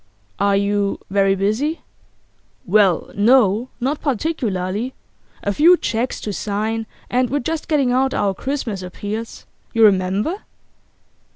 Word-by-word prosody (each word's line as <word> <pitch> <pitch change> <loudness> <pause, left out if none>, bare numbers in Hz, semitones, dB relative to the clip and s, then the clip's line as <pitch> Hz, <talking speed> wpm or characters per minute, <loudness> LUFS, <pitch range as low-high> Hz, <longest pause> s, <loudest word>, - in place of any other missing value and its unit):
'Are 200 0 +3
you 200 0 0
very 195 0 +3
busy?' 220 - -1 0.8
'Well, 190 -3 +3
no, 225 +1 +3
not 275 +4 -1
particularly. 235 - -2 0.5
A 200 - 0
few 340 - +6
cheques 235 -2 -2
to 210 - -4
sign, 215 +3 -2 0.2
and 250 0 +1
we're 285 - 0
just 315 +4 -3
getting 280 -6 +2
out 265 +1 +2
our 200 -1 +1
Christmas 240 -4 -3
appeals. 205 +5 -6 0.3
You 230 - +3
remember? 200 - +3
220 Hz, 120 wpm, -20 LUFS, 200-260 Hz, 0.8 s, few